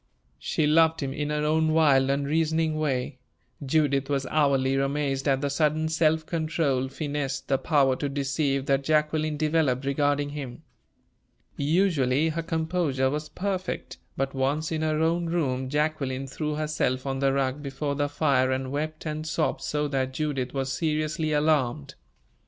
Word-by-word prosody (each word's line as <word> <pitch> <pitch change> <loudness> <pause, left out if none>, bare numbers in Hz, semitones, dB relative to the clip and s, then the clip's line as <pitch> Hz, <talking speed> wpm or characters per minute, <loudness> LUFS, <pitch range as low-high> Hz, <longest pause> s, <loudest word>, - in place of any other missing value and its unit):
She 155 - 0
loved 160 +1 +4
him 135 -1 -2
in 145 +1 -3
her 150 0 -1
own 155 +1 +2
wild, 140 -4 +4
unreasoning 155 +3 +1
way. 130 -3 -2 0.4
Judith 140 -1 +1
was 140 -1 0
hourly 140 -3 +2
amazed 135 0 -1
at 135 -1 +2
the 145 - 0
sudden 155 +2 +1
self 160 0 +2
control, 155 -6 0
finesse, 140 -1 -3
the 135 -1 0
power 140 -4 +3
to 145 - -2
deceive, 135 0 -1
that 135 0 +1
Jacqueline 155 +1 +1
developed 150 -4 +1
regarding 145 +1 +1
him. 135 -4 -7 0.9
Usually 150 -3 +2
her 165 +1 -2
composure 160 -5 0
was 150 +1 -4
perfect, 190 -1 -4 0.2
but 135 0 -1
once 140 +4 -1
in 160 -1 -1
her 155 0 +1
own 170 +1 +1
room, 130 -6 -1
Jacqueline 145 -3 -1
threw 150 +3 -3
herself 150 -4 -1
on 135 -1 -2
the 135 0 +2
rug 135 +1 -1
before 140 +1 -3
the 145 0 -1
fire 140 -3 +2
and 130 0 -2
wept 155 +3 -4
and 155 0 -4
sobbed 155 -1 -1
so 150 0 -1
that 130 -2 -1
Judith 135 -4 -2
was 135 -1 -2
seriously 155 +1 -1
alarmed. 145 - +1
145 Hz, 155 wpm, -26 LUFS, 135-155 Hz, 0.9 s, loved